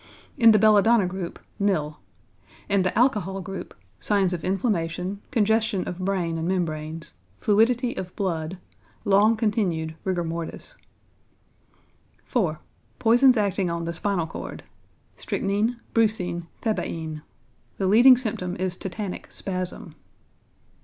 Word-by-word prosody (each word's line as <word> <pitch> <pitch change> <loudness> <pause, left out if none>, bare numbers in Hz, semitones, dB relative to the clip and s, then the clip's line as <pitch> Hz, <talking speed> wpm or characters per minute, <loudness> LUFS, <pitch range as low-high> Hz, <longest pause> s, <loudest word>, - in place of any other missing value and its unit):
In 230 -4 +6
the 215 - +7
belladonna 215 0 +5
group, 180 -1 -5 0.2
nil. 155 -7 0 0.7
In 200 -1 +2
the 185 +2 -1
alcohol 210 -6 +2
group, 195 +1 -7 0.2
signs 195 -3 +2
of 175 - -4
inflammation, 185 -1 -1
congestion 220 -2 +1
of 180 - -5
brain 180 -3 -1
and 165 - -2
membranes, 160 -3 -3 0.2
fluidity 235 - +2
of 180 -1 -6
blood, 175 -2 -2 0.5
long 205 +3 +4
continued 190 -8 0
rigor 185 -2 -1
mortis. 165 - -5 1.5
4. 180 - 0 0.4
=Poisons 245 +2 +5
Acting 200 -3 +1
on 170 0 -3
the 170 - -3
Spinal 180 -1 0
Cord.= 160 - -7 0.5
Strychnine, 210 +5 -1
brucine, 180 -7 +1 0.2
thebaïne. 160 -8 -2 0.6
The 195 - -1
leading 240 +6 +7
symptom 195 -7 -3
is 185 0 -2
tetanic 190 0 -5
spasm. 185 -2 -4
190 Hz, 115 wpm, -25 LUFS, 170-215 Hz, 1.5 s, the